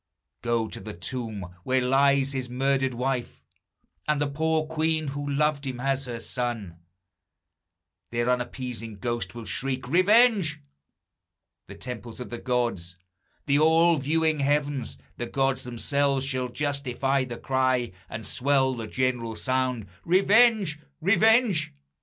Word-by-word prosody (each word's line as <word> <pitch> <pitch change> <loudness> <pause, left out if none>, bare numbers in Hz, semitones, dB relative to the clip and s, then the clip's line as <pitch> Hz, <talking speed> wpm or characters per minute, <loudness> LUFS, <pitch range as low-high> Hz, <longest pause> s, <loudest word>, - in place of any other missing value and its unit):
Go 120 -2 0
to - - -7
the 110 -3 -8
tomb 105 -1 -5
where 130 0 +2
lies 135 +1 +3
his 130 -2 -3
murdered 135 0 0
wife, 125 0 -2 0.7
And 150 -1 +2
the 145 - +2
poor 155 +2 0
queen, 155 -1 0
who 145 +1 -4
loved 145 0 +1
him 125 -2 -4
as 135 +1 0
her 120 -2 -5
son, 115 -8 -4 1.3
Their 120 0 -1
unappeased 125 -3 -3
ghosts 120 +3 -2
will 115 -1 -7
shriek, 130 0 -2
Revenge! 195 - +4 1.1
The - - -10
temples 120 -2 -7
of 125 - -7
the 120 - -5
gods, 120 -9 -1 0.5
the 145 0 +3
all 165 +2 +5
viewing 155 +2 +1
heavens, 140 - 0 0.2
The 120 - -3
gods 135 0 0
themselves, 135 +3 0
shall 130 -2 -2
justify 140 -1 0
the 120 -2 -6
cry, 130 -2 +1 0.2
And 110 0 -6
swell 130 0 +2
the 115 -3 -5
general 120 -2 -1
sound, 130 -3 -1 0.2
Revenge! 195 -2 +4 0.2
Revenge! 200 - +3
130 Hz, 130 wpm, -26 LUFS, 120-150 Hz, 1.3 s, all